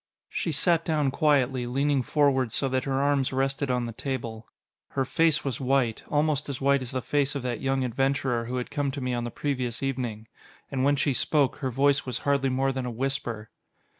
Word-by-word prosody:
She 165 - -2
sat 165 +2 +2
down 150 -4 +1
quietly, 135 -5 +2
leaning 140 +2 +1
forward 135 -3 +2
so 135 +5 0
that 130 0 0
her 135 -1 0
arms 140 -2 +2
rested 135 +1 0
on 125 -1 +1
the 115 - -4
table. 115 -3 -5 0.5
Her 135 -1 +1
face 160 +2 +2
was 135 -1 -2
white, 130 -3 +1
almost 150 -1 +1
as 135 - -3
white 140 0 +3
as 125 - -5
the 130 -1 -3
face 140 +2 +1
of 140 - -3
that 120 -3 -3
young 135 -1 +1
adventurer 130 -1 0
who 125 +2 -4
had 125 -1 -3
come 145 -1 0
to - - -4
me 125 -1 -1
on 120 -1 -2
the - - -3
previous 125 -2 -2
evening. 120 -5 -3 0.4
And 130 -2 0
when 145 +1 +4
she 140 0 +1
spoke, 140 +2 +1
her 135 -3 -2
voice 140 +3 +2
was 125 -3 -3
hardly 140 -1 +2
more 135 +1 +1
than 130 -1 -3
a - - -2
whisper. 120 -3 -3
135 Hz, 210 wpm, -27 LUFS, 125-140 Hz, 0.5 s, when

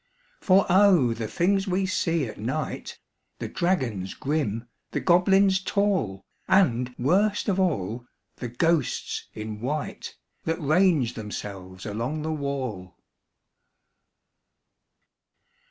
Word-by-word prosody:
For 195 0 +4
O! 180 - +5
the 115 -1 -4
things 195 - +1
we 190 +1 +1
see 170 -5 0
at 110 - -8
night - - -4 0.4
The - - -4
dragons 125 - -1
grim, 125 -6 -2 0.2
the - - -2
goblins 190 +2 +4
tall, 190 - 0 0.2
And, 125 -10 +3
worst 195 - +2
of 195 -2 +1
all, 120 - -1 0.3
the 125 - -4
ghosts 150 +4 0
in 110 -1 -6
white 145 +5 -4 0.3
That 165 +1 -1
range 155 -5 +3
themselves 100 -3 -7
along 120 +9 -3
the 160 0 -1
wall! 130 - -4
150 Hz, 105 wpm, -26 LUFS, 115-185 Hz, 0.4 s, O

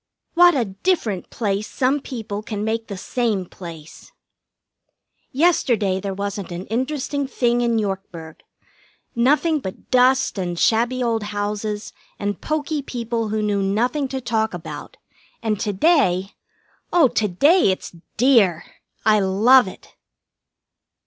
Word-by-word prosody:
What 350 -1 +6
a 250 -4 +1
different 205 - -1
place 205 -2 -2
some 265 +3 0
people 220 -6 -6
can 210 -2 -5
make 225 +1 -2
the 200 - -6
same 215 -2 -1
place! 165 - -11 1.2
Yesterday 240 - +2
there 195 0 -4
wasn't 200 -1 -4
an 175 +2 -5
interesting 275 +3 -2
thing 240 -2 +1
in 235 -1 +1
Yorkburg. 190 -6 -4 0.8
Nothing 295 +6 +2
but 190 -8 -9
dust 255 -3 +3
and 175 -2 -3
shabby 240 +6 +2
old 230 -2 0
houses 210 0 -4 0.2
and 205 -1 -3
poky 305 -1 -2
people 235 -4 -3
who 215 0 -1
knew 205 -1 0
nothing 240 +9 0
to 265 0 -4
talk 220 -5 -1
about, 175 - -8 0.5
and 215 -3 0
to 210 - -1
day 195 - +2 0.6
oh, 340 -6 +5
to 220 -2 0
day 285 - +4
it's 185 -2 -3 0.2
dear! 220 - +4 0.4
I 215 -1 +5
love 210 +6 +5
it! 185 - -12
220 Hz, 130 wpm, -21 LUFS, 195-255 Hz, 1.2 s, What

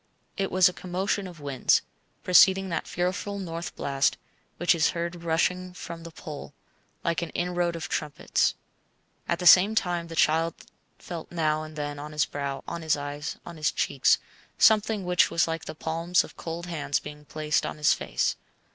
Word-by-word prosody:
It 195 -1 -1
was 185 0 +6
a 180 - -1
commotion 190 +2 -2
of 175 -3 -11
winds, 140 -3 +2 0.4
preceding 190 +1 +6
that 170 - -2
fearful 185 +3 -2
north 170 -3 -5
blast 135 -2 +1 0.4
which 175 +2 +4
is 165 -2 +3
heard 170 0 -3
rushing 180 +2 0
from 170 -2 -7
the 165 - -8
pole, 145 -3 -9 0.5
like 170 0 0
an 170 - -3
inroad 175 -1 0
of 165 - -5
trumpets. 150 -2 0 0.7
At 170 - +1
the 180 - -5
same 190 +5 +8
time 175 -5 0
the 165 - -8
child 160 +1 +2 0.4
felt 170 -2 -8
now 155 -2 +1
and 155 0 -9
then 145 -1 -4
on 150 +1 -7
his 150 -1 +2
brow, 140 -1 -4
on 170 - -4
his 160 -2 +1
eyes, 145 +1 -5
on 170 -1 -9
his 155 0 +1
cheeks, - - +2 0.4
something 215 -2 +4
which 180 0 +4
was 170 - +2
like 165 0 -3
the - - -7
palms 165 +3 +1
of - - -12
cold 170 +1 -5
hands 150 -5 -1
being 150 0 -10
placed 155 0 0
on - - -4
his 150 - +4
face. - - -1
165 Hz, 180 wpm, -27 LUFS, 155-180 Hz, 0.7 s, same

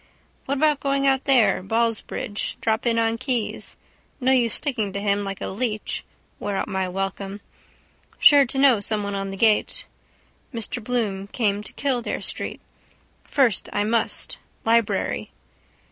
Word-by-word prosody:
What 280 +1 -1
about 300 0 +3
going 275 0 0
out 270 -1 +2
there: 255 -9 +4
Ballsbridge. 225 0 -1
Drop 220 +1 0
in 230 -1 +2
on 230 0 +1
Keyes. 255 -4 -2 0.4
No 260 0 +2
use 240 -4 +3
sticking 235 -9 -1
to 200 - -2
him 200 0 +1
like 195 -1 -5
a - - -2
leech. 215 +1 -2 0.4
Wear 205 -1 -2
out - - -1
my 190 -1 -1
welcome. 195 +1 -3 0.8
Sure 285 -2 +7
to 270 - -5
know 270 -5 +5
someone 205 -1 -1
on 195 0 -2
the 195 - -6
gate. 215 0 +2 0.7
Mr 230 -1 -3
Bloom 210 -5 -1
came 205 -2 0
to 210 - -9
Kildare 255 -4 -1
street. - - -4 0.6
First 255 -9 +2
I 205 - 0
must. 225 +1 0 0.3
Library. 230 -1 +1
225 Hz, 145 wpm, -24 LUFS, 200-255 Hz, 0.8 s, Sure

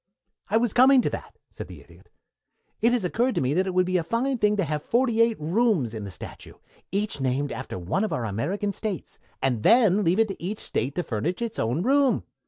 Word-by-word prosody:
"I 215 - +3
was 230 -2 +1
coming 260 +1 +6
to - - -1
that," - - -7
said - - -8
the - - -11
Idiot. - - -19 0.7
"It 235 - +4
has 245 -4 +1
occurred 240 +6 0
to - - +1
me 130 +2 +1
that 185 +4 +1
it 185 - -2
would 185 0 +4
be 185 0 +1
a 170 - 0
fine 240 +8 -1
thing 210 0 +2
to 195 - +2
have 150 -2 -2
forty 235 - +1
eight 230 -1 +2
rooms 170 - +1
in 110 -2 -5
the - - -6
statue, 95 - -10 0.4
each 200 -6 -2
named 135 +2 0
after 130 - -6
one 90 - -1
of 215 - -2
our 120 - -2
American 175 - -2
States, 205 -4 -5 0.2
and 125 -5 +1
then 210 - +5
leave 175 +2 +2
it 225 -1 +3
to 195 - -7
each 205 +4 -3
State 130 +5 -2
to 180 - -1
furnish 150 +10 -2
its 230 -2 -4
own 120 +10 0
room. 275 +1 +3
195 Hz, 230 wpm, -25 LUFS, 145-230 Hz, 0.7 s, coming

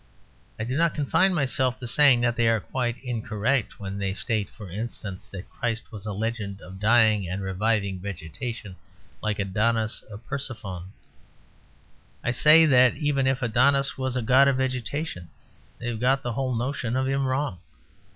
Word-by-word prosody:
I 110 - -3
do 125 +3 -3
not 165 +2 +2
confine 160 +6 +2
myself 130 -5 +1
to 125 - -8
saying 130 0 +5
that 120 -1 +1
they 120 -1 +2
are 115 -1 +3
quite 120 +1 -2
incorrect 120 0 -1
when 100 0 -5
they 95 -1 -2
state 105 +1 -2
(for 105 - -11
instance) 105 0 -6
that 95 -3 -9
Christ 120 -2 -3
was 105 -2 -8
a - - -2
legend 105 -1 -3
of 95 -1 -11
dying 110 -3 +4
and 95 +2 -3
reviving 100 0 0
vegetation, 100 - -6 0.4
like 110 -1 -1
Adonis 110 +3 0
or 105 - -8
Persephone. 110 -8 -6 1.3
I 120 - +1
say 155 +6 +7
that 125 -4 +5
even 145 -3 0
if 130 0 0
Adonis 135 +3 +3
was 130 -1 -3
a 125 - -1
god 130 +4 +5
of 135 -2 +2
vegetation, 130 - -3 0.5
they 120 - -4
have 115 -2 -4
got 135 +3 +2
the 120 - -2
whole 130 0 -1
notion 125 0 -2
of 130 0 0
him 135 0 0
wrong. 130 -8 -1
120 Hz, 170 wpm, -25 LUFS, 105-130 Hz, 1.3 s, say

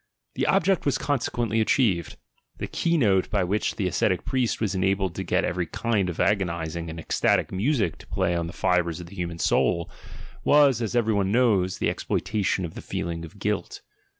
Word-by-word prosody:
The - - -1
object 195 -1 +2
was 140 -2 +1
consequently 120 -6 0
achieved. 95 - +1 0.4
The - - -3
keynote 115 - +1
by 100 -3 +1
which 100 +4 -1
the 100 - -2
ascetic 90 0 0
priest 130 -3 0
was 105 -3 -1
enabled 95 -1 0
to - - -4
get - - +1
every 90 -1 -2
kind 105 -6 0
of 85 - -6
agonising 85 -4 0
and 80 +1 -7
ecstatic - - +1
music 100 - 0
to - - -15
play 85 - 0
on 85 -1 -1
the - - -6
fibres 90 -2 +1
of 90 - -7
the 90 +4 -13
human 85 -2 -4
soul 85 0 +1 0.3
— - - -17
was, 140 -5 +5
as 115 +1 -2
every 115 -2 +2
one 100 -1 +1
knows, 105 -6 +2
the - - 0
exploitation 100 -3 -1
of 80 - -7
the - - -8
feeling 85 -1 -4
of 85 +5 -11
"guilt." 105 0 -3
100 Hz, 190 wpm, -25 LUFS, 85-115 Hz, 0.4 s, was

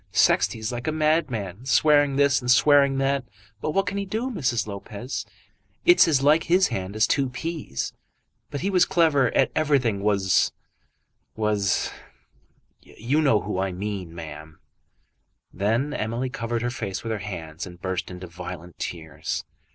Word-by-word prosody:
Sexty - - +3
is 110 +1 -3
like 120 0 -5
a - - +2
madman, 135 - 0
swearing 145 +1 +4
this 140 -1 +3
and 125 - -4
swearing 140 +1 +5
that; 135 0 +1 0.4
but - - -2
what 195 +5 +1
can 200 +1 -2
he 200 - -3
do, 230 +6 -2
Mrs. 125 - 0
Lopez? 105 +5 -6 0.6
It's 350 - +7
as 140 -4 +2
like 150 +3 +4
his 185 +2 +4
hand 95 -3 -4
as 110 - +4
two 135 -2 +1
peas; 145 - -4 0.6
but 145 - -5
he 195 - 0
was 180 -2 +5
clever 160 -9 +3
at - - +3
everything 135 -9 +2
was 100 -3 +2 0.8
was 105 -3 0 0.9
you 135 +8 -1
know 125 -9 +3
who 95 -2 -3
I 95 0 0
mean, 95 -2 -5
ma'am." 80 -1 -9 1.0
Then 115 +9 0
Emily 120 +4 -2
covered 115 0 -3
her 120 - -1
face 100 -7 -4
with 115 - -3
her 110 - -2
hands 85 -4 -6
and 90 -1 -12
burst 95 -1 -3
into 90 0 -8
violent 90 0 -9
tears. 80 -5 -4
120 Hz, 160 wpm, -25 LUFS, 95-145 Hz, 1.0 s, It's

